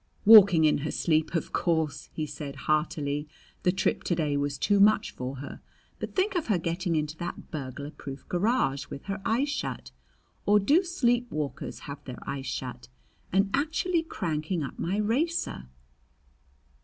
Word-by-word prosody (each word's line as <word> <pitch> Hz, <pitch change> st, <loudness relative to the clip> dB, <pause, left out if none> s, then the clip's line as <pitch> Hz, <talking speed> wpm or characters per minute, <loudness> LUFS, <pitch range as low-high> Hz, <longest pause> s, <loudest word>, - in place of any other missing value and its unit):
"Walking 200 Hz, -7 st, +9 dB
in 150 Hz, -, +3 dB
her 150 Hz, +2 st, -3 dB
sleep, 160 Hz, +1 st, +1 dB
of 165 Hz, -, -2 dB
course!" 160 Hz, -4 st, 0 dB
he 155 Hz, -, -3 dB
said 145 Hz, -2 st, -7 dB
heartily. 150 Hz, -1 st, 0 dB, 0.3 s
"The 180 Hz, -, +3 dB
trip 190 Hz, -, 0 dB
to 175 Hz, -, +1 dB
day 150 Hz, -3 st, 0 dB
was 140 Hz, 0 st, -1 dB
too 205 Hz, +8 st, +2 dB
much 210 Hz, +2 st, +4 dB
for 130 Hz, +2 st, -5 dB
her. 140 Hz, +2 st, -8 dB, 0.4 s
But -, -, -6 dB
think 390 Hz, +2 st, +2 dB
of 350 Hz, -4 st, -1 dB
her 210 Hz, -5 st, +3 dB
getting 170 Hz, +1 st, -1 dB
into 155 Hz, 0 st, -1 dB
that 175 Hz, -, -6 dB
burglar 140 Hz, -1 st, -5 dB
proof 135 Hz, -3 st, -9 dB
garage 180 Hz, -, +1 dB
with 140 Hz, -, -8 dB
her 195 Hz, +1 st, -4 dB
eyes 260 Hz, +8 st, +1 dB
shut 295 Hz, -, -4 dB, 0.6 s
or 210 Hz, +1 st, +6 dB
do 285 Hz, -, +4 dB
sleep 245 Hz, -9 st, +1 dB
walkers 150 Hz, -6 st, -4 dB
have 140 Hz, 0 st, -8 dB
their 125 Hz, -3 st, -7 dB
eyes 135 Hz, -1 st, -4 dB
shut? 125 Hz, -, -5 dB, 0.4 s
and 195 Hz, +2 st, +2 dB
actually 325 Hz, +5 st, +1 dB
cranking 170 Hz, -, -2 dB
up 135 Hz, -, -7 dB
my 185 Hz, +4 st, -1 dB
racer!" 230 Hz, -, -1 dB
170 Hz, 165 wpm, -28 LUFS, 145-215 Hz, 0.6 s, Walking